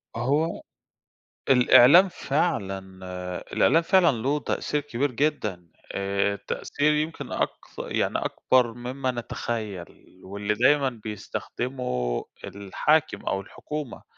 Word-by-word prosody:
هو 145 +8 0 0.9
الإعلام 135 +8 +7
فعلًا 120 - -1 0.7
الإعلام 165 - +4
فعلًا 180 -2 +4
له 140 +4 +1
تأثير 150 0 -2
كبير 140 -1 -2
جدًا، 105 - -1 0.2
آآ 100 +1 0
التأثير 145 +8 -1
يمكن 155 +2 -3
أكث - - -4
يعني - - -1
أكبر 125 -3 +1
مما 125 +2 -3
نتخيل 110 -6 -5 0.2
واللي 100 +2 -2
دايمًا 135 +5 +3
بيستخدمه 105 - -3 0.2
الحاكم 150 +11 0
أو 95 - -1
الحكومة، 150 +6 -7
125 Hz, 95 wpm, -25 LUFS, 100-150 Hz, 0.9 s, الإعلام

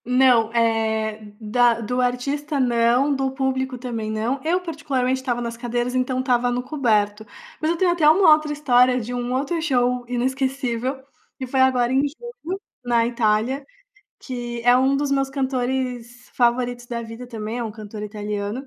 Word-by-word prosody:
Não, 250 -2 +4
eh, 220 -2 0
da 230 +2 +2
do 250 +3 -1
artista 280 +4 -1
não, 245 +3 +3
do 270 0 0
público 265 -1 -2
também 235 -3 -4
não. 225 +5 -2
Eu, 345 +3 +1
particularmente, 280 -7 -1
estava 245 -2 -2
nas 235 -1 -4
cadeiras, 240 +1 -2
então 255 0 0
estava 245 -1 +1
no 245 0 -1
coberto. 215 -7 0 0.4
Mas 310 - +1
eu 340 - 0
tenho 360 0 +3
até 325 -3 +4
uma 320 +1 +6
outra 305 0 0
história, 255 -4 +3
de 240 +1 -5
um 245 0 -3
outro 285 +6 -1
show 250 -5 +1
inesquecível, 260 0 -2 0.3
que 265 - -4
foi 260 +1 -1
agora 255 -1 +3
em 265 - +4
junho, 380 - -7 0.2
na 235 -1 +2
Itália, 235 +3 0 0.6
que 240 -2 -6
é 245 0 +6
um 265 +2 +3
dos 285 0 -1
meus 275 -1 +1
cantores 255 -3 -3
favoritos 245 0 0
da 235 -1 -4
vida 230 +2 -9
também. 225 -1 -5
É 240 - -2
um 220 - -4
cantor 215 -1 -8
italiano. 210 +3 -4
250 Hz, 165 wpm, -22 LUFS, 235-270 Hz, 0.6 s, uma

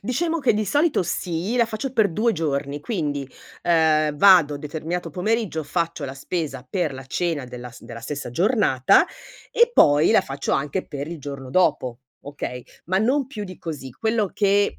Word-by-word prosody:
Diciamo 325 - -1
che 260 -7 +2
di 215 0 0
solito 290 - +2
sì, 175 +5 -2
la 235 - +4
faccio 235 +4 -4
per 220 -5 +3
2 230 +5 +2
giorni, 145 -4 -2
quindi, 145 - -3 0.3
ehm, 155 -3 +3
vado 165 -4 +6
determinato 160 +4 -4
pomeriggio, 185 -2 -1
faccio 165 0 -2
la 130 - -5
spesa 140 -2 -4
per 170 -5 -1
la 130 0 -8
cena 165 -1 -1
della 125 -1 -8
s 120 - -15
della 115 -1 -9
stessa 145 +2 -5
giornata, 175 - +3 0.5
e 475 +1 +4
poi 145 +2 +5
la - - +6
faccio 135 +1 -4
anche 145 +7 -1
per 145 +1 -5
il 170 0 -6
giorno 140 -2 -7
dopo, 130 -7 +1 0.2
okay? 135 -3 -6 0.2
Ma 185 +3 +1
non 255 +5 +1
più 215 -6 -7
di 185 -2 -8
così. 145 -7 -6
Quello 220 - -1
che, 200 0 +2
165 Hz, 175 wpm, -23 LUFS, 140-205 Hz, 0.5 s, vado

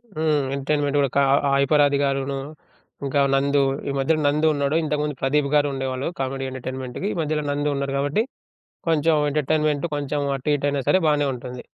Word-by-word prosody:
హ్మ్. 155 0 +1 0.2
ఎంటర్‌టైన్మెంట్ 145 +1 0
గూడా 140 -1 +2
కా - - +5 0.3
హైపరాది 140 +1 +3
గారును, 135 0 -1 0.7
ఇంకా 140 +1 0 0.2
నందు, 140 +1 +2 0.3
ఈ - - 0
మధ్యలో 155 +4 +1
నందు 150 +2 +2
ఉన్నాడు 140 +1 0
ఇంతకుముందు 150 -1 -1
ప్రదీప్ 140 +1 +1
గారు 145 0 +4
ఉండేవాళ్ళు 130 +1 -3
కామెడీ 135 0 -2
ఎంటర్‌టైన్మెంట్‌‌కి. 130 +5 -5
ఈ - - -7
మధ్యల 155 -1 -1
నందు 145 0 0
ఉన్నారు 140 0 -2
గాబట్టి 145 +10 +1 0.7
కొంచెం 160 0 +3 0.2
ఎంటర్‌టైన్మెంట్ 150 +1 0
కొంచెం 145 0 -2 0.2
అటు 135 +3 -2
ఇటయినా 145 0 -1
సరే - - +5
బానే 145 -1 +2
ఉంటుంది. 125 0 -8
145 Hz, 160 wpm, -23 LUFS, 135-150 Hz, 0.7 s, కా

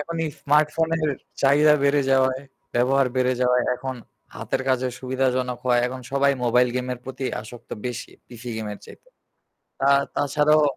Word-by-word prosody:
এখন 165 +3 -5
এই 155 - -2
স্মার্টফোনের 155 +2 +2 0.3
চাহিদা 150 +2 +5
বেড়ে 140 0 +3
যাওয়ায়, 130 0 +2 0.3
ব্যবহার 130 +2 +3
বেড়ে 130 0 +2
যাওয়ায়, 125 -1 +3
এখন 130 +1 -5 0.4
হাতের - - -3
কাজে 130 -1 +1
সুবিধাজনক 130 -1 -1
হওয়ায় 120 -1 +3
এখন 130 +1 -6
সবাই 140 0 +3
মোবাইল 125 +1 +4
গেমের 125 -1 -3
প্রতি 130 0 -6 0.2
আসক্ত 115 +2 -13 0.2
বেশি 125 0 -5 0.2
পিসি 120 0 -9
গেমের 105 -2 -5
চাইতে। - - -15 0.7
তা, 135 - +2 0.3
তাছাড়াও। 150 +2 +3
130 Hz, 145 wpm, -23 LUFS, 125-145 Hz, 0.7 s, চাহিদা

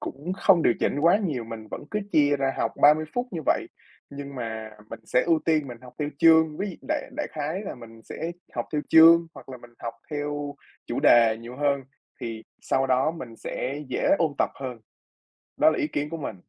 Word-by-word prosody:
cũng 150 +7 -5
không 190 -3 +4
điều 120 - +4
chỉnh 145 - 0
quá 170 +5 +5
nhiều, 150 - -2
mình 110 -1 -9
vẫn - - -6
cứ 210 - -1
chia 145 -1 +4
ra 135 -1 -1
học - - 0
30 150 +2 +6
phút 245 +1 -1
như 170 -4 -4
vậy, - - +2 0.4
nhưng 140 0 -8
mà 110 -3 -5 0.2
mình 115 - -8
sẽ 125 - +2
ưu 165 -2 +3
tiên 155 -4 +1
mình 120 -1 -8
học 125 - -12
theo 150 - -1
chương. 160 -2 +5
Ví 200 - -2
dụ - - -10
đại 310 -3 -2
đại 300 - -2
khái 155 +6 -3
là - - -6
mình 115 -2 -13
sẽ 165 +8 -5 0.2
học - - -2
theo 150 - +1
chương, 165 +1 +8
hoặc - - -13
là 130 - -7
mình 120 0 -15
học 115 -1 -5 0.2
theo 145 -1 -3 0.3
chủ - - -2
đề 115 -2 +6
nhiều 120 +2 -9
hơn, 140 -2 0 0.4
thì 115 -2 -5 0.2
sau 135 0 0
đó 130 +4 +2
mình 125 -9 -9
sẽ 140 +6 -4
dễ - - -1
ôn 160 -4 +1
tập - - +2
hơn, 130 -3 -6 0.8
đó - - +6
là - - -1
ý - - 0
kiến 145 +1 -3
của 165 - -5
mình. 135 -9 -5
145 Hz, 220 wpm, -25 LUFS, 125-160 Hz, 0.8 s, chương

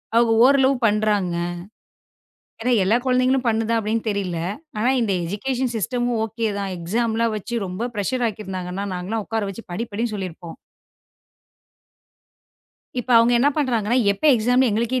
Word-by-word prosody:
அவங்க 230 0 +4
ஓரளவு 270 0 +4
பண்றாங்க. 205 -4 +1 1.3
ஏன்னா 250 +2 +1
எல்லா 215 +5 +3
குழந்தைகளும் 255 0 +2
பண்ணுதா 225 +1 +1
அப்படின்னு 220 +1 -1
தெரியல. 190 -4 -2 0.4
ஆனா 240 +4 +2
இந்த 220 -4 0
எஜிகேஷன் 245 +7 -2
சிஸ்டம் 240 +3 -1
ஓகேதான். 210 -3 -2
எக்ஸாம் 220 +7 -1 0.2
வச்சு 230 +1 -3
ரொம்ப 200 +7 -4
ப்ரெஷ்ஷர் 240 +5 -1
ஆக்கி 215 0 -7
இருந்தாங்கன்னா 185 +1 -4
நாங்க 180 +1 -5
எல்லாம் 225 -2 -2
உக்கார 225 -2 -1
வச்சு 225 +4 -9
படி 230 +6 -3
படின்னு 225 +2 -2
சொல்லி 190 -3 -3
இருப்போம். 170 0 -11 2.4
இப்ப 250 +1 -4
அவங்க 230 +1 +4
என்ன 275 +4 +4
பண்றாங்க 240 -4 +1 0.2
எப்ப 200 - -10
எக்ஸாம் 245 +4 +3
எங்களுக்கே 235 +4 0
225 Hz, 140 wpm, -22 LUFS, 200-245 Hz, 2.4 s, அவங்க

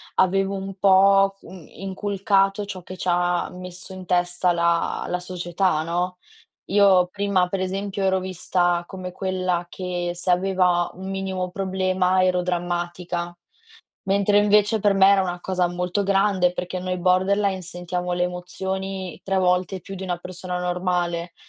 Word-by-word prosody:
avevo 195 +1 +2
un 195 0 -6
po', 195 +1 +5
mhmm, 180 -5 -12
inculcato 195 +1 0
ciò 195 -2 -7
che 185 +2 -9
ci 180 - -5
ha 175 0 +1
messo 180 +1 -9
in 185 -1 -9
testa 175 0 +1
la 170 0 0
la 180 - -1
società, 180 -2 -1
no. 175 +2 -2 0.5
Io 195 -2 +5
prima 200 -2 +1
pre 185 +1 -2
esempio, 195 +1 -3
ero 190 0 +2
vista 175 -1 0
come 185 -1 -7
quella 185 -2 -1
che 175 -1 -3
se 175 +1 -2
aveva 180 -1 +2
un 190 +1 -8
minimo 190 -1 -3
problema, 185 -1 +1
ero 180 -1 +2
drammatica. 175 0 -3 0.7
Mentre 200 +1 +3
invece 210 +1 +3
per 205 -1 +3
me 195 0 +6
era 200 -1 +5
una 180 -2 -2
cosa 180 -1 0
molto 180 +3 -1
grande, 195 -2 +2
perché 180 +1 -4
noi 185 0 -3
borderline 190 +2 +2
sentiamo 180 0 -3
le 175 - -1
emozioni 190 +1 -4
3 195 0 -1
volte 185 0 +1
più 195 +3 -9
di 190 - -7
una 180 -2 -2
persona 180 +1 -6
normale, 175 -1 -1
185 Hz, 150 wpm, -23 LUFS, 180-195 Hz, 0.7 s, me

